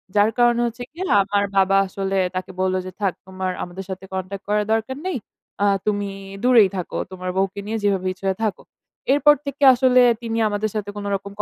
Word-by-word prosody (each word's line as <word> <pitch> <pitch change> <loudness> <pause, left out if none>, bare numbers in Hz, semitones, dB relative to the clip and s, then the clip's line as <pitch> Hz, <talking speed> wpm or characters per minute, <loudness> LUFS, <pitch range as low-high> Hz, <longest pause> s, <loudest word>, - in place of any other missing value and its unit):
যার 210 +2 +4
কারণে 240 0 +4
হচ্ছে 235 +1 -6
গিয়ে 355 +5 -5 0.2
আমার 200 +1 0
বাবা 195 0 +4
আসলে 195 +1 -2 0.2
তাকে 185 0 -4
বলল 185 0 +1
যে 185 - -6
"থাক 195 -3 +1
তোমার 185 0 -3
আমাদের 180 +2 -7
সাথে 190 0 -6
কনট্যাক্ট 190 +1 -5
করার 210 0 +2
দরকার 225 +4 -2
নেই। 370 - -1 0.5
আ - - +4 0.2
তুমি 205 -1 0 0.3
দূরেই 235 -6 +6
থাকো, 180 - -4
তোমার 185 -1 -5
বউকে 195 +1 0
নিয়ে 225 +1 -2
যেভাবে 195 -2 +1
ইচ্ছা 190 +1 -12
হয় 190 - -1
থাকো।" 210 - -2 0.5
এরপর 295 +1 +6
থেকে 280 0 -4
আসলে 255 0 +4 0.2
তিনি 225 -1 -3
আমাদের 210 +1 -1
সাথে 205 -1 -3
কোন 205 - -5
রকম 200 +1 -6
205 Hz, 195 wpm, -22 LUFS, 190-230 Hz, 0.5 s, দূরেই